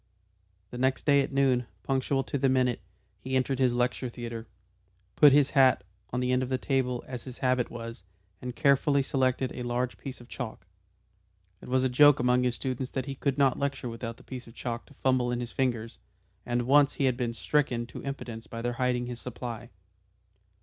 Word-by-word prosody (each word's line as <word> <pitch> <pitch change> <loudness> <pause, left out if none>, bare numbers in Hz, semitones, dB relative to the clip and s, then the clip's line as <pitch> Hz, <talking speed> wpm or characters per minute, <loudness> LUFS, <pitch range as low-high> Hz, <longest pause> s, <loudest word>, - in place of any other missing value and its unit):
The 125 - -6
next 130 +1 +1
day 140 -1 +5
at 135 - -3
noon, 130 -3 +2 0.2
punctual 135 0 0
to 140 - -3
the 135 0 +3
minute, 125 -3 +2 0.4
he 130 +5 -3
entered 130 0 +1
his 130 -2 +4
lecture 125 +1 0
theatre, 115 -1 -7 0.7
put 145 - +8
his 140 0 +4
hat 130 -4 +5 0.3
on 125 - -2
the 125 0 +1
end 125 0 +2
of 130 - -2
the 130 - +1
table 130 -2 -1
as 125 -3 -7
his 130 -2 -8
habit 125 -1 +2
was, 115 -3 -7 0.4
and 125 -1 -5
carefully 140 0 +3
selected 130 -1 0
a - - -6
large 120 +1 -2
piece 135 -2 -7
of 120 - -14
chalk. 115 -7 -6 1.0
It - - -10
was 130 0 +2
a - - +4
joke 145 +3 +6
among 125 0 +3
his 125 -1 +1
students 130 0 -3
that 130 - -2
he 140 - -4
could 135 0 -1
not 135 -3 +3
lecture 135 -3 -2
without 115 0 -6
that - - -16
piece 125 -2 -8
of 115 - -14
chalk 120 -1 -5
to 145 - -18
fumble 130 -2 +1
in 120 - -1
his 120 -1 -5
fingers, 120 -4 -2 0.5
and 120 0 0
once 140 +3 +4
he - - -1
had 130 -2 +2
been 120 -2 -1
stricken 120 +3 0
to 115 - -9
impotence 120 -5 -6
by 115 0 -6
their 120 0 -1
hiding 125 -1 +1
his 120 -1 -6
supply. 120 -2 -6
125 Hz, 205 wpm, -28 LUFS, 120-135 Hz, 1.0 s, put